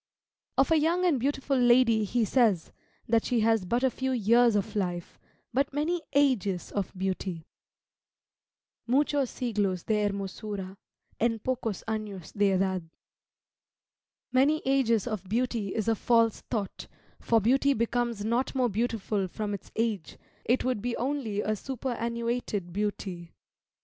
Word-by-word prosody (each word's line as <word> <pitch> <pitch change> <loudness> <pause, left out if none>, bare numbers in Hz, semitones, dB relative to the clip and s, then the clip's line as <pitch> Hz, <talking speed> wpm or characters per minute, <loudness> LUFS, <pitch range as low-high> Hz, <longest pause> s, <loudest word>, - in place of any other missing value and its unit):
Of 270 +4 +3
a 320 - +5
young 340 +4 +2
and 315 -7 +3
beautiful 275 +1 0
lady 240 -3 +5
he 230 +3 +1
says, 215 -8 +2 0.4
that 230 0 +3
she 240 -3 +1
has 225 -3 +2
but 235 +7 0
a 260 - +3
few 265 +1 -2
years 235 0 +4
of 205 0 -1
life, 175 -4 -3 0.3
but 275 +2 +1
many 330 +4 0
ages 225 -11 +1
of 200 -2 -2
beauty. 185 -3 -3 1.4
"Muchos 280 +1 +2
siglos 205 -7 -1
de 210 -1 +1
hermosura 195 -1 -5 0.4
En 230 0 +2
pocos 225 -3 -3
anos 210 -5 -4
de 205 -1 +2
edad." 185 -3 0 1.4
Many 280 +4 +3
ages 260 -5 +2
of 210 -6 -4
beauty 230 -3 -1
is 220 -1 -1
a 225 - +4
false 230 0 +2
thought, 210 -5 -3 0.3
for 230 - +3
beauty 270 +6 +3
becomes 235 -2 -1
not 240 +5 0
more 255 -2 +2
beautiful 215 -2 -1
from 205 +3 -4
its 200 - -7
age; 220 -7 -2 0.3
it 245 +2 +2
would 255 -5 0
be 240 +1 -2
only 250 -6 -1
a 215 +1 0
superannuated 235 -5 -3
beauty. 190 -4 -3
225 Hz, 140 wpm, -28 LUFS, 200-255 Hz, 1.4 s, a